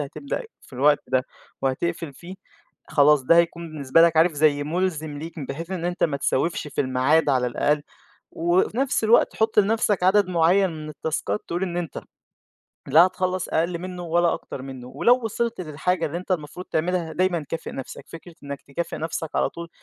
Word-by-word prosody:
هتبدأ 215 - -4 0.2
في - - -20
الوقت 145 +3 +3
ده 130 0 +1 0.4
وهتقفل 155 +3 -2
فيه، 175 +7 -10 0.5
خلاص 145 -1 +4
ده 165 +6 +4
هيكون 170 0 +1
بالنسبة 145 +2 +3
لك 170 -1 +4
عارف 165 +1 +5
زي 145 -1 +2
مُلزِم 160 -3 -2
ليك 165 +2 -8
م 135 - -5
بحيث 165 +5 -6
إن 175 -3 -3
أنت 175 +1 0
ما 145 -4 0
تسوفش 150 +3 -1
في - - -3
الميعاد 135 +4 +2
على 130 -2 +2
الأقل، 145 +4 +1 0.5
وفي 175 +6 +1
نَفس 270 -4 +1
الوقت 225 +2 +4
حط 220 -1 +1
لنَفسك 210 -2 +2
عدد 190 +1 +4
معيّن 180 +2 +3
من 155 -1 -7
التاسكات 150 -9 -3
تقول 175 +2 -2
إن 175 -2 -2
أنت 175 -3 -4 0.9
لا 165 +6 +7
هتخلّص 185 0 -2
أقل 170 +2 0
منُّه 180 0 -6
ولا 170 +1 +2
أكتر 130 - -8
منُّه، 130 -2 -8
ولو 240 - +4
وصلت 230 -1 -2
للحاجة 165 +2 -1
اللي 160 +3 -4
أنت 185 - -12
المفروض 170 +2 -4
تعملها 170 0 -1
دايمًا 175 -4 0
كافئ 165 - -5
نَفسك، 135 - -8
فكرة 165 +1 -11
إنّك 140 0 -6
تكافئ 155 +5 -5
نَفسك 160 0 -4
على - - +1
طول 170 0 -8
165 Hz, 180 wpm, -24 LUFS, 145-180 Hz, 0.9 s, لا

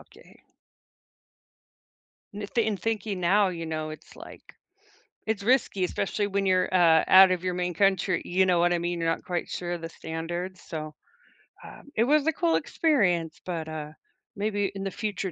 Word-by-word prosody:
okay. - - -19 1.9
N 210 - -6
th 230 -2 +2
in 210 -2 0
thinking 210 -1 -2
now, 195 +3 +3
you 165 -2 -5
know, 155 -1 -4
it's, 155 - -12
like - - -12 0.9
it's 220 -2 -1
risky, 240 -5 +2
especially 205 +3 -2
when 200 0 -1
you're, 185 0 +2
uh, 165 -3 +5
out 190 0 +8
of 180 0 -1
your 180 -1 -1
main 180 0 -2
country, 190 -1 +1
you 190 +1 +2
know 180 -2 +2
what 175 0 +3
I - - +2
mean? 175 0 -2
You're 165 0 0
not 165 - -2
quite 180 -2 -3
sure 175 -1 -4
of 170 - -5
the 165 - -5
standards, 170 +3 -6
so, 155 -2 -6 0.7
um, - - -12
it 230 - +3
was 295 +1 +3
a 320 - +3
cool 335 +2 +1
experience, 180 - +1
but, 165 -3 -4
uh, 155 -1 -6 0.4
maybe 205 -1 -1
in 195 - -5
the 195 - -3
future 200 -3 -3
185 Hz, 180 wpm, -26 LUFS, 170-205 Hz, 1.9 s, out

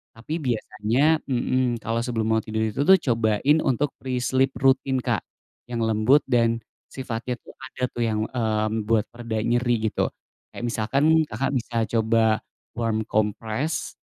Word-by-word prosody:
tapi 120 +8 -5
biasanya 125 +5 +1
mhm, 125 -2 0
kalo 115 +1 -2
sebelum 115 -3 -1
mau 110 - +2
tidur 110 0 -3
itu 110 +5 -2
tuh 190 - +8
cobain 115 +5 +3
untuk 135 +3 +1
pre-sleep 130 +1 0
rutin, 135 0 +2
Kak, - - -1 0.5
yang 120 - -2
lembut 110 +5 +4
dan 115 -1 +2 0.3
sifatnya 125 -1 -4
tuh, - - -15
ada 130 -1 -8
tuh, 120 - -3
yang, 110 -2 0 0.2
eee, 110 -3 +1
membuat 110 -1 0
pereda 115 -2 -4
nyeri 120 +1 +2
gitu, - - 0 0.4
kayak - - -8
misalkan 140 +8 +2
Kakak 120 +6 -1
bisa 120 -1 -3 0.2
coba 110 -1 +2 0.4
warm 115 -1 0
compress, 110 +8 -1
120 Hz, 145 wpm, -24 LUFS, 110-130 Hz, 0.5 s, tuh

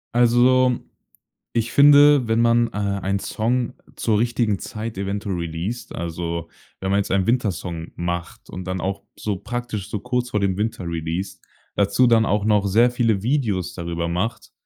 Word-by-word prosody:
Also, 125 +1 +4 0.7
ich 115 0 0
finde, 145 -2 +7
wenn 115 0 +1
man, 115 0 +4
äh, - - -12
einen 100 -1 -1
Song 120 +4 -1 0.2
zur 110 -2 +1
richtigen 115 -3 0
Zeit 110 -1 -6
eventuell 100 0 -3
releast, 85 +8 -4
also 85 0 -4 0.3
wenn 95 0 -2
man 100 - +3
jetzt 100 - -2
einen 95 -1 +2
Winter-Song 90 -8 -1
macht 85 0 -5
und 90 - -7
dann 95 0 -3
auch 95 +1 -3
so 105 -3 -2
praktisch 110 -1 -5
so 105 - -3
kurz 125 +1 -2
vor 105 - 0
dem 95 -2 0
Winter 105 -4 -2
releast, 85 +3 -4 0.3
dazu 100 +5 +3
dann 115 -1 +4
auch 105 0 0
noch 105 -2 +3
sehr 115 +5 +4
viele 115 -5 +1
Videos 110 - 0
darüber 85 -1 -3
macht, 95 +7 -3
105 Hz, 165 wpm, -22 LUFS, 95-120 Hz, 0.7 s, finde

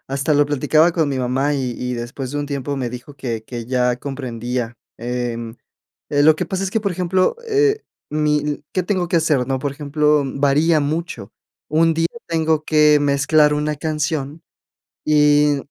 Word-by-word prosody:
hasta 140 +3 0
lo 145 0 +4
platicaba 155 +4 +3
con 160 -4 +1
mi 135 -2 -2
mamá 135 +4 0
y 130 -3 -2
y 125 0 -3
después 125 +2 -5
de 145 - -3
un 145 - -3
tiempo 140 0 -3
me 125 -3 -3
dijo 125 +3 -9
que 120 -5 -4
que 120 -1 -6
ya 125 -1 +1
comprendía, 120 -3 -4 0.2
em, 120 -1 -4 0.5
eh, 145 0 +2
lo 155 0 +6
que - - -3
pasa 190 0 -3
es 190 - -3
que, 225 - +1
por 200 -3 -1
ejemplo, 185 - +1
eh, 430 0 +2 0.3
mi 150 0 +1
l 150 0 -4
¿qué 185 - 0
tengo 180 -2 -1
que 170 - +2
hacer, 150 -6 +1
no? 135 -1 -1
Por 140 0 -2
ejemplo, 150 0 +1
varía 145 +4 +2
mucho. 150 - -3 0.4
Un 165 +2 +3
día 165 +1 +1 0.2
tengo 160 -2 +1
que 150 -1 +4
mezclar 150 +1 +3
una 150 +1 -1
canción 150 0 -3 0.6
y 150 -1 +4
145 Hz, 180 wpm, -20 LUFS, 130-155 Hz, 0.6 s, lo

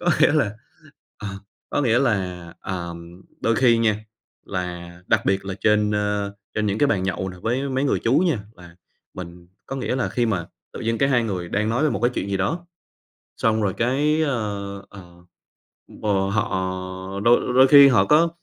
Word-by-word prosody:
Có 175 - -1
nghĩa - - +6
là 110 -9 +1 0.6
à, 105 - -5 0.4
có 145 - 0
nghĩa 120 -3 +3
là, 90 -9 -1
ờm, 85 -1 -7 0.2
đôi 115 -1 +1
khi 120 -3 +4
nha, 110 -2 +1 0.4
là 90 -2 -5
đặc - - +2
biệt 95 0 +1
là 95 -1 -4
trên, 105 -1 +3
ơ, 105 -1 -1 0.2
trên 110 -1 0
những 100 +1 -1
cái 145 - +4
bàn 105 -9 +1
nhậu 95 0 -2
nè 90 - -9
với 130 +5 -1
mấy 135 +1 0
người 140 - +1
chú 130 +6 +4
nha, 170 -8 +2 0.2
và 90 -1 -15 0.4
mình 85 -1 -9 0.2
có 135 - -5
nghĩa 130 -1 -2
là 125 - 0
khi 120 -1 0
mà 95 -7 -1 0.3
tự - - -7
dưng 115 0 -1
cái 135 - +3
hai 125 -3 +3
người 90 -5 -3
đang 105 +4 0
nói 125 +7 +1
về 155 - +2
một - - -2
cái 120 +1 +2
chuyện 100 - -3
gì 100 - 0
đó, 165 - -2 0.7
xong 110 -1 +1
rồi 100 - +1
cái, 145 +6 +1
ơ, 105 -8 -2
ờ, 100 - -12 0.9
ừm, - - -15
ờ, 100 -2 +1
họ 110 +2 0 0.7
đôi 120 +2 +3
đôi 130 +1 +7
khi 140 0 +9
họ 110 -7 +4
có 160 +8 +4
105 Hz, 200 wpm, -23 LUFS, 95-130 Hz, 0.9 s, khi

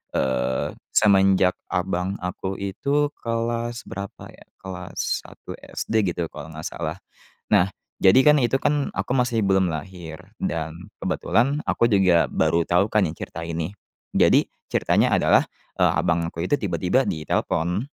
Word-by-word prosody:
eee, 65 -1 0 0.2
semenjak 95 -3 +4 0.2
abang 90 +1 -1
aku 90 +1 -4
itu 140 +9 0
kelas 115 0 -2
berapa, 100 0 -7
ya, - - -16 0.2
kelas 90 -2 -4
1 - - -10
SD, 105 -5 -1
gitu, 85 -2 -3
kalau 80 - -9
nggak 80 - -7
salah. - - -5 0.5
Nah, 90 +2 +5 0.3
jadi, 95 +7 +7
kan, 150 -2 +6
itu, 130 +3 +2
kan, 145 0 0
aku 125 - -2
masih 120 -5 +1
belum 95 -2 +3
lahir, 80 -1 -7 0.2
dan 80 -1 -2 0.2
kebetulan 140 +6 0
aku 115 - +2
juga 95 -6 +4
baru 80 +1 +1
tau, 95 +5 +2
kan, 105 -4 +3
ya, 80 - -4
cerita 80 - -7
ini. 85 0 -3 0.5
Jadi - - +4 0.2
ceritanya - - +2
adalah, - - +4 0.3
eee, - - +4
abangku 85 -1 -1
itu 90 +11 +1
tiba-tiba 95 +6 +1
ditelepon, 85 - -1
95 Hz, 140 wpm, -23 LUFS, 85-115 Hz, 0.5 s, jadi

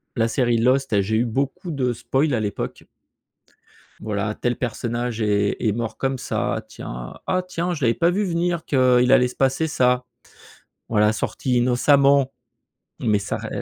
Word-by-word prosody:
la 115 -2 +2
série, 120 0 +1
Lost, 130 +3 +2
là, 100 -2 +3
j'ai 105 +3 -1
eu 120 - +2
beaucoup 135 - -2
de 130 -4 0
spoils 135 +4 0
à - - 0
l'époque 105 -2 -4 1.2
voilà 105 0 -2
tel 120 +2 -1
personnage 120 0 -3
est 100 -1 +1
est 110 -3 +1
mort 115 0 -4
comme 135 0 -1
ça, - - -2
tiens. - - -8
Ah 185 0 +1
tiens, 180 0 -2
je 155 - -7
l'avais 115 -1 +3
pas 170 0 +2
vu 200 +4 0
venir 170 -2 -1
qu'il 125 -2 +3
allait 125 -2 +5
se 125 - -11
passer 135 +4 +1
ça. 125 -3 +2 0.9
Voilà 105 -1 +3
sorti 125 +3 -1
innocemment 135 +2 +4 0.7
mais 105 -3 +1
ça 100 - -3
re - - -7
125 Hz, 165 wpm, -22 LUFS, 110-140 Hz, 1.2 s, allait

